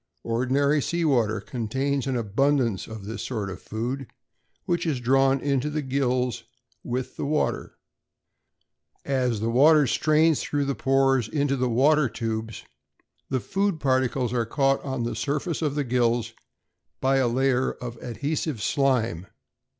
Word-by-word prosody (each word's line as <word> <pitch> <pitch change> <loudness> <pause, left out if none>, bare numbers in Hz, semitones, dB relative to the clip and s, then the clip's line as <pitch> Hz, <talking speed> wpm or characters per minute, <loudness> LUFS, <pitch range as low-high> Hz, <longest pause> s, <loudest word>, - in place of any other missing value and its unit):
Ordinary 135 +5 +1
sea 170 +4 -1
water 115 -7 +2
contains 130 +5 -2
an 135 - -1
abundance 120 0 +1
of 110 -3 -8
this 110 +2 -5
sort 105 -6 -3
of 95 - -9
food, 120 +5 -4 0.6
which 175 -1 -1
is 145 -6 0
drawn 135 +2 +3
into 140 0 0
the 150 0 -2
gills 130 -2 -1 0.4
with 125 +1 -4
the - - -3
water. 150 +1 -1 1.3
As 125 -5 0
the 115 +1 0
water 150 +4 +6
strains 155 +4 +3
through 145 -1 -1
the 140 - 0
pores 135 -3 +2
into 145 0 0
the 125 -1 0
water 140 +3 +3
tubes, 110 -1 -4 0.7
the 130 - 0
food 195 - -1
particles 130 -3 +1
are 120 -2 +1
caught 135 +4 +1
on 130 -3 -3
the 120 - -3
surface 150 +3 -2
of 150 -3 -1
the 145 - 0
gills 120 -2 0 0.7
by 135 +1 +2
a 130 -2 +3
layer 130 +1 +1
of 120 -1 -8
adhesive 140 +2 -3
slime. 115 - 0
130 Hz, 145 wpm, -25 LUFS, 120-140 Hz, 1.3 s, water